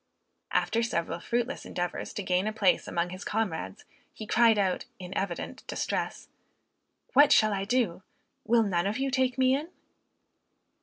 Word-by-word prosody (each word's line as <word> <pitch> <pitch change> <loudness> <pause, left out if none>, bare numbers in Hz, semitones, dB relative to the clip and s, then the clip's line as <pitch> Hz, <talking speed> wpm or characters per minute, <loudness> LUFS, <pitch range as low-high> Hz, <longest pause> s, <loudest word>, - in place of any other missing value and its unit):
After 230 - +1
several 170 -8 -2
fruitless 240 +3 -2
endeavors 175 -1 -4
to 205 - -3
gain 185 +2 +1
a - - 0
place 210 -4 +2
among 175 +1 -1
his 185 +2 -7
comrades, 185 - -3 0.3
he 215 - -8
cried 225 0 +4
out, 190 -3 0
in 185 0 -8
evident 190 -3 -3
distress, - - -3 0.9
"What 290 +2 +7
shall 215 -1 +5
I 195 0 -2
do? 215 -6 0 0.4
Will 230 +1 +3
none 180 -3 0
of 210 +4 -1
you 270 0 -1
take 260 -1 +1
me 260 0 +4
in?" 300 +4 -4
215 Hz, 155 wpm, -28 LUFS, 185-240 Hz, 0.9 s, What